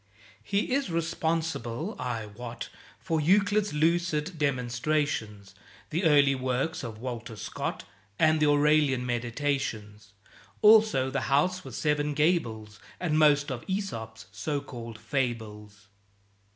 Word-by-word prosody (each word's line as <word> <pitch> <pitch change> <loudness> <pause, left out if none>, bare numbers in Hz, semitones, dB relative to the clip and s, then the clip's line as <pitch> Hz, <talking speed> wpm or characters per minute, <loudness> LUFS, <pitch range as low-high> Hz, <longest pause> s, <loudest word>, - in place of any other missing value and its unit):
He 200 +4 -1
is 275 -6 0
responsible, 165 - -2
I 115 -3 -3
wot, 115 +3 -8 0.3
For 165 -4 -1
Euclid's 205 +5 +3
lucid 165 +1 0
demonstrations, 125 -6 -1 0.4
The 170 +4 0
early 145 -3 +5
works 130 +4 -2
of 115 -3 -6
Walter 120 -1 -6
Scott, - - -4 0.3
And 155 0 +4
the 150 - +3
Aurelian 145 -3 +3
"Meditations"; 120 -4 -3 0.5
Also 215 -11 +6
"The 135 - -2
House 180 +7 +2
with - - -9
Seven 150 -1 0
Gables" 115 - 0 0.2
And 155 -4 +1
most 145 -1 +4
of 120 -2 -5
Æsop's 115 - -4
(so 145 +8 -2
called) 120 -5 -8
Fables. 105 -6 -4
145 Hz, 115 wpm, -28 LUFS, 115-160 Hz, 0.5 s, Also